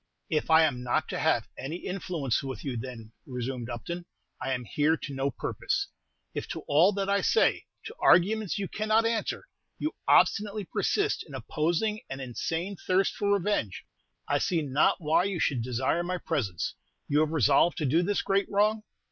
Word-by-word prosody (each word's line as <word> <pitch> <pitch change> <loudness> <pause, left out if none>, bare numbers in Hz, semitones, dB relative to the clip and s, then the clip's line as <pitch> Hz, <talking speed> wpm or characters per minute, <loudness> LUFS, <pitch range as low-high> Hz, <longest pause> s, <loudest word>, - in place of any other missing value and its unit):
"If 155 0 0
I 160 0 +7
am 135 -6 +1
not 125 -1 0
to - - -3
have - - +2
any 135 +5 -4
influence 175 -8 -2
with 130 -3 -6
you, 135 -3 -2
then," 115 -2 -7 0.2
resumed 125 -2 -4
Upton, 170 +9 -5 0.3
"I 135 - -2
am 125 -2 -2
here 150 +7 +2
to 140 - -7
no 135 +1 0
purpose. 400 - -2 0.4
If - - -4
to - - -5
all 160 +7 +4
that 195 0 -2
I 200 0 +2
say 450 - +2 0.2
to 445 - -7
arguments 210 +3 +4
you 200 -1 -2
cannot 215 +3 +1
answer 230 -1 -1 0.3
you 310 - -2
obstinately 210 -1 +3
persist 410 - 0
in 145 - -9
opposing 170 - -1
an 135 - -5
insane 165 - -3
thirst 190 +2 +1
for 205 0 0
revenge, 195 - 0 0.4
I - - +2
see 170 -3 0
not 140 +1 +2
why 165 +3 +3
you 195 -3 -2
should 135 -6 +1
desire 130 +7 0
my 180 +1 -2
presence. 120 - -2 0.3
You 145 - +2
have 155 0 +2
resolved 150 +2 +3
to 155 - -1
do 155 +6 +3
this 200 +3 0
great 195 +1 +1
wrong?" 210 +2 +2
165 Hz, 180 wpm, -28 LUFS, 135-200 Hz, 0.4 s, I